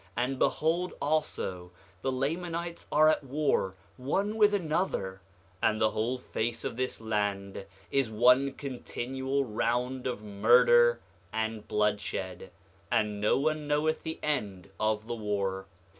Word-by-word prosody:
And 130 +2 0
behold 170 +3 +1
also, 140 - -1 0.3
the 130 - 0
Lamanites 170 +5 -3
are 155 +1 +6
at 155 - +3
war 135 -9 0 0.2
one 195 +11 -1
with 210 -2 +5
another; 155 - -1 0.4
and 110 -1 +2
the 110 -1 +3
whole 120 +4 -1
face 120 -2 -3
of - - -3
this 130 +1 -2
land 100 -3 -2 0.2
is 135 -4 +2
one 125 +5 +4
continual 135 0 -3
round 125 +3 -1
of 120 -4 -4
murder 120 +3 +5 0.3
and 110 -1 -3
bloodshed; 105 -3 -1 0.4
and 105 -1 0
no 105 - +3
one 155 +1 0
knoweth 150 +2 +1
the 160 - -5
end 100 -11 -2
of 110 0 0
the 120 - -4
war. 100 -3 -2
120 Hz, 130 wpm, -29 LUFS, 105-145 Hz, 0.4 s, are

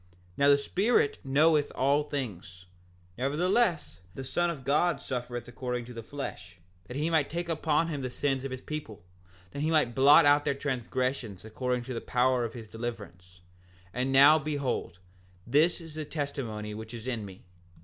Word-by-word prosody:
7:13 90 - -30 0.3
Now 140 0 +4
the 140 - +7
Spirit 185 +4 +1
knoweth 150 +2 +3
all 140 +3 +3
things; 100 - -6 0.5
nevertheless 165 - +1 0.2
the 135 - -5
Son 175 +6 0
of 150 -6 -5
God 150 +3 +2
suffereth 120 -2 -5
according 125 0 -4
to 125 - -10
the 115 - -6
flesh 135 -4 -7 0.3
that 125 - -7
he 155 +3 0
might 155 -3 +2
take 170 +1 -3
upon 160 0 +1
him 145 -4 -3
the 130 - -3
sins 135 +1 -1
of 135 - -3
his 130 0 -6
people, 110 - -7 0.5
that - - -6
he 155 - +1
might 150 -7 +2
blot 145 +5 +7
out 145 0 +5
their 145 -2 0
transgressions 125 -6 -3
according 125 +2 -2
to 130 - -6
the 115 - -4
power 125 0 +2
of 115 0 -4
his 115 -2 -8
deliverance; 100 -6 -8 0.5
and 125 +2 -1
now 140 +4 +7
behold, 140 - -3 0.5
this 150 +9 +3
is 165 -2 -11
the 155 0 -4
testimony 135 -9 -4
which 110 +2 -8
is 115 0 -8
in 120 -4 -2
me. 95 -2 -11
135 Hz, 180 wpm, -29 LUFS, 120-150 Hz, 0.5 s, the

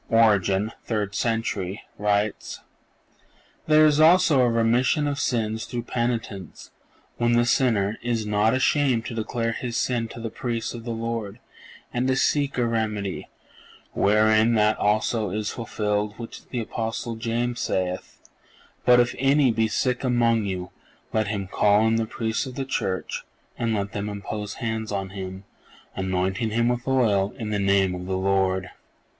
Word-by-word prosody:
Origen 105 -2 +3
(third 105 -3 -2
century) 110 -4 -2 0.2
writes: 105 0 -1 1.1
"There 155 0 +6
is 150 -1 +4
also 160 -3 +6
a 125 - +4
remission 120 +6 +2
of 145 0 -2
sins 110 -4 -1
through 120 -1 -4
penitence, 115 -7 -4 0.5
when 120 0 +2
the 120 0 +4
sinner... 110 -5 +1
is 115 -2 -1
not 105 +3 +2
ashamed 130 -3 +2
to - - -5
declare 115 +1 -2
his 120 0 -4
sin 120 -2 0
to 115 - -10
the 115 -1 -5
Priest 115 -3 -3
of 120 -1 -8
the - - -5
Lord, 115 -2 -3 0.6
and 125 +1 0
to 130 - +2
seek 140 0 +1
a 120 - +2
remedy... 105 -4 -2 0.6
wherein 110 +2 +3
that 105 0 +3
also 105 +1 +1
is 105 +2 -2
fulfilled 105 -2 -2
which 115 -1 -9
the 125 - -2
Apostle 115 +1 -4
James 115 +1 -2
saith: 90 -3 -3 0.7
'_But 125 0 +8
if 120 0 +3
any 135 -1 +4
be 110 0 +1
sick 125 +4 -1
among 115 -3 +2
you, 90 -2 -4 0.4
let 110 -1 +1
him 100 -2 -2
call 105 +3 +3
in 110 0 +2
the 115 -1 -1
Priests 110 +3 -2
of 130 - -8
the 135 - -3
Church, 95 -8 -2 0.3
and 115 -2 -1
let 100 -1 -2
them 100 +1 -3
impose 105 0 -5
hands 110 -2 -3
on 95 -2 -3
him, 95 0 -7 0.5
anointing 95 +3 -1
him 115 +2 +1
with 125 +1 -2
oil 105 -7 +2
in 110 -2 -4
the 105 - 0
name 100 -1 +2
of 90 0 -6
the 95 0 -1
Lord_. 95 -1 +1
110 Hz, 160 wpm, -24 LUFS, 100-120 Hz, 1.1 s, But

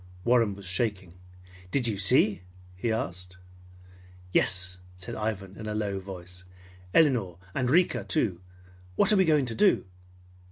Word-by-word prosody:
Warren 120 -4 +3
was 100 0 -12
shaking. 95 -2 -1 0.6
"Did 125 +3 +1
you 105 -4 -2
see?" 105 -1 +3 0.3
he 115 +5 -2
asked. 90 -4 -4 0.9
"Yes," 90 0 +1 0.2
said 90 - -6
Ivan 105 -3 -4
in 110 +1 -8
a 105 - -3
low 100 -2 -2
voice. 90 -1 -9 0.5
"Elinor 120 - +3 0.2
and 125 +1 0
Rika, 175 +6 +3
too! 100 - -1 0.5
What 205 - +5
are - - +4
we 190 - +5
going 150 -4 +3
to 120 - -3
do?" 200 - +3
105 Hz, 145 wpm, -28 LUFS, 95-125 Hz, 0.9 s, What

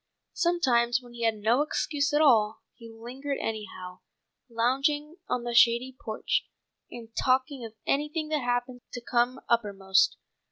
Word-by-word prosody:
Sometimes 260 -10 +2
when 245 -2 -15
he 235 -1 -3
had 225 -1 +2
no 220 +6 +2
excuse 295 -1 -1
at 295 +1 +3
all 220 -6 +3
he 230 -2 -13
lingered 255 +5 -5
anyhow, 195 -5 -6 0.5
lounging 275 +7 0
on 245 - -1
the 240 0 -3
shady 240 +2 +4
porch, 220 -2 -1 0.5
and 230 -2 -10
talking 260 +1 +1
of 225 -1 -9
anything 300 +2 -1
that 305 -2 0
happened 245 0 -2
to 245 - -5
come 245 +2 0
uppermost. 195 -4 +2
245 Hz, 145 wpm, -28 LUFS, 230-280 Hz, 0.5 s, shady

